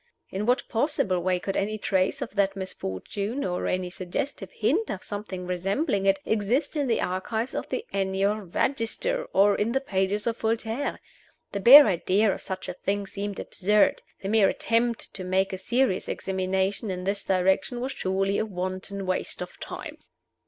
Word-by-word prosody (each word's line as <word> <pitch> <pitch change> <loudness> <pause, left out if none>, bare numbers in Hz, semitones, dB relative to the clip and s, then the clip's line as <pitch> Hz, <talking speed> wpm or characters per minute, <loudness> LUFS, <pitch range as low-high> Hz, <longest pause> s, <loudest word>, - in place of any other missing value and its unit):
In 200 +3 -2
what 250 +2 +2
possible 225 - +1
way 180 0 +1
could 195 +2 -3
any 215 +2 0
trace 195 +7 0
of 230 - -8
that 195 -1 +1
misfortune, 195 - -4
or 180 -1 -1
any 185 -1 -1
suggestive 195 +11 -4
hint 445 - +1
of 190 - -4
something 205 -3 -5
resembling 195 - 0
it, 195 0 +5
exist 225 +9 0
in 290 -3 0
the 230 - +2
archives 220 +7 -2
of - - -4
the 465 - -3
"Annual 195 +1 +1
Register" 275 - -1
or 200 +1 +5
in 225 +3 0
the 265 - +3
pages 200 -4 -1
of 230 0 0
Voltaire? 225 +4 -1 0.5
The 200 - -2
bare 275 +8 +11
idea 195 +1 +2
of - - -6
such 190 -1 -5
a 180 - -3
thing 200 +2 -2
seemed 200 0 -5
absurd 210 +2 +2 0.2
The 195 - -2
mere 215 -2 +5
attempt 230 0 0
to 190 - -4
make 190 +1 +1
a - - -2
serious 235 -1 +1
examination 190 +2 -1
in 180 -1 -3
this 200 +1 -1
direction 190 +6 +1
was 260 +2 -2
surely 195 -1 0
a - - 0
wanton 185 +1 -4
waste 185 0 -2
of - - -7
time. - - -7
200 Hz, 175 wpm, -26 LUFS, 190-230 Hz, 0.5 s, bare